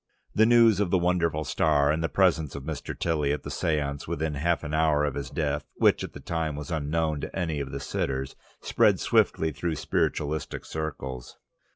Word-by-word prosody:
The 110 +1 +4
news 115 -4 +6
of 100 -3 +1
the 95 - +3
wonderful 85 -3 +1
star, 75 -2 +2
and 80 +2 -1
the 80 - 0
presence 75 0 +2
of 70 - -6
Mr. - - -5
Tilly 75 -4 0
at 75 -2 -2
the - - -6
séance 70 -3 -1
within 80 0 -2
half 80 +4 0
an 75 0 -5
hour 75 -2 +3
of 70 - -1
his 70 -2 -5
death, 75 -1 -1
which - - +3
at - - -7
the - - -9
time 80 -3 -2
was 75 +2 -6
unknown 80 -1 -1
to - - -6
any 80 -5 -1
of 70 -1 -4
the 70 - -4
sitters, 65 -1 -3 0.3
spread - - +3
swiftly 80 0 +2
through 80 +3 -3
spiritualistic 75 0 -2
circles. 65 -5 -5
75 Hz, 195 wpm, -27 LUFS, 70-80 Hz, 0.3 s, news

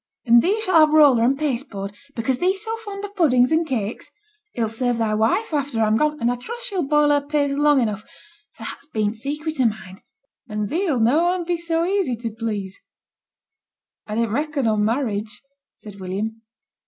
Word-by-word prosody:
'And 235 0 +6
thee 405 - +1
shalt 370 -4 +4
have 310 -1 +6
t' 305 - +1
roller 275 -7 +6
and 265 +3 +2
paste 275 -3 -2
board, 200 -1 -6 0.2
because 245 +2 -1
thee's 380 +3 +1
so 445 0 -3
fond 410 -3 -7
o' - - -7
puddings 285 -10 +3
and 320 +1 +2
cakes. 225 -6 -3 0.4
It 235 - -2
'll - - +1
serve 245 +1 -1
thy 225 -2 0
wife 225 - +1
after 280 -5 -1
I'm 215 -1 +3
gone, 300 +4 +1
and 235 0 +1
I 245 - -2
trust 470 - -7
she'll 360 -8 -2
boil 295 0 +3
her 290 0 +3
paste 285 -1 0
long 295 0 +3
enough, 215 -4 -1 0.5
for - - -12
that's 280 - -8
been 215 -8 0
t' 225 - -9
secret 300 +3 -3
o' - - +3
mine, 205 -4 -3 0.5
and 210 -1 -3
thee'll 330 -6 0
noane 335 +10 +2
be 350 +1 0
so 335 0 -1
easy 375 -9 0
t' 230 0 -5
please.' 210 -4 -4 1.3
'I 210 - -4
din't 230 -1 0
reckon 290 +1 -1
on 215 -2 +2
marriage,' 215 -2 -2 0.3
said 205 -2 -12
William. 205 +4 -4
260 Hz, 200 wpm, -22 LUFS, 220-315 Hz, 1.3 s, And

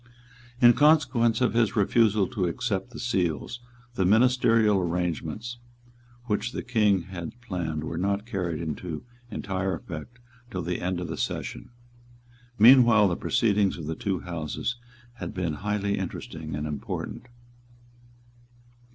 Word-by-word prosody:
In 120 -1 +8
consequence 130 -6 +3
of 125 - +2
his 115 -2 +2
refusal 105 0 +3
to 100 -8 -1
accept 100 +4 -2
the 115 - -10
Seals, 95 - -1 0.3
the 95 - 0
ministerial 115 0 +4
arrangements 90 +6 -3 0.7
which 110 +1 -1
the - - -4
King 105 -6 +2
had 90 +5 -8
planned 85 -10 -3
were 80 +1 -4
not 100 +2 0
carried 90 -8 -3
into 80 0 -5 0.2
entire 95 -3 -2
effect 85 +9 -8 0.3
till 90 -6 -4
the 90 +1 -3
end 90 0 -1
of 90 - -4
the - - -5
session. - - -4 0.9
Meanwhile 115 -3 +7
the 85 - 0
proceedings 105 -2 +1
of 80 - -6
the 80 - -2
two 95 0 -2
Houses 85 +7 -3 0.4
had 115 - -6
been 90 -4 -1
highly 100 -1 -1
interesting 80 -4 -5
and 75 0 -3
important. 75 +9 -5
100 Hz, 135 wpm, -26 LUFS, 85-115 Hz, 0.9 s, In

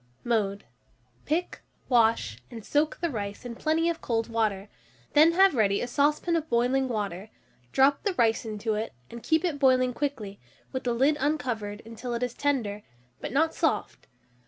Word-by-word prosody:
Mode. 205 -4 0 0.6
Pick, 330 +4 -2 0.3
wash, 225 - +2
and 225 -3 -9
soak 300 +1 +1
the 340 -2 0
rice 205 0 -5
in 240 - -5
plenty 315 +6 0
of 335 -1 -1
cold 230 -1 -1
water; 215 -3 -1 0.5
then 315 +3 +6
have 385 +1 +5
ready 200 -5 +2
a - - -1
saucepan 295 +6 +1
of 320 -1 -2
boiling 250 +3 +2
water, 205 -4 -4 0.4
drop 275 +1 +4
the 400 -4 -1
rice 225 -4 +2
into 220 0 -3
it, 215 +2 -3 0.2
and 235 - -8
keep 320 +6 +1
it 310 -5 -2
boiling 255 -2 +4
quickly, 235 -8 -4 0.3
with 260 - -4
the 240 - +1
lid 280 +5 +3
uncovered, 245 -8 -2
until 230 +2 -5
it 235 - -2
is 245 -1 -2
tender, 235 -9 -1 0.4
but - - -5
not 320 +5 +2
soft. - - -1
245 Hz, 170 wpm, -27 LUFS, 220-290 Hz, 0.6 s, then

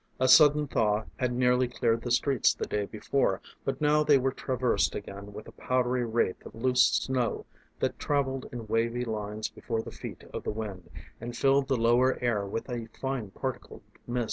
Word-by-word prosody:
A 130 - +3
sudden 150 +3 +7
thaw 105 -3 +1
had 125 -1 0
nearly 125 0 +2
cleared 115 -1 0
the 120 - -4
streets 130 +1 +3
the - - -3
day 105 -1 -2
before, 105 -3 0 0.2
but - - -2
now 150 0 +3
they 145 -2 +5
were 135 0 +1
traversed 130 -2 0
again 100 +1 -7
with 105 - -9
a - - -10
powdery 125 -1 0
wraith 115 -4 0
of - - -11
loose 125 +2 +3
snow 130 -3 -1 0.3
that - - -1
travelled 135 -2 -1
in 120 -2 -6
wavy 115 +3 0
lines 110 -1 -3
before 115 -2 -4
the - - -8
feet - - -9
of - - -4
the - - -4
wind, 105 -5 -6 0.3
and 120 +1 -6
filled 135 0 +3
the 135 -2 +1
lower 120 +3 +3
air 110 -5 0
with 115 - -4
a 120 -3 -4
fine 135 -6 -3
particled - - -6 0.2
mist. 125 +1 -1
120 Hz, 190 wpm, -28 LUFS, 110-130 Hz, 0.3 s, sudden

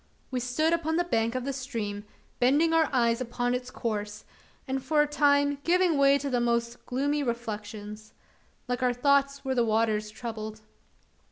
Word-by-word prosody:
We 255 - -1
stood 280 +7 +1
upon 320 -1 0
the 350 - +2
bank 230 -7 0
of 255 -1 -2
the 275 - -2
stream, 220 -6 -4 0.3
bending 290 +7 +3
our 320 -2 +3
eyes 235 -2 +2
upon 245 0 -1
its 250 0 -3
course, 210 -2 -4 0.4
and 265 0 -2
for 300 -1 +3
a - - -2
time 285 -1 +2
giving 355 -1 +3
way 280 0 +5
to 280 0 -4
the 245 -1 +1
most 235 0 -1
gloomy 285 +4 0
reflections. 215 -3 -5 0.6
Like 245 +1 -2
our 250 -1 +2
thoughts 280 +2 +2
were 265 - 0
the 245 -2 +2
waters 215 -1 +1
troubled. 215 -1 -7
250 Hz, 170 wpm, -28 LUFS, 230-285 Hz, 0.6 s, way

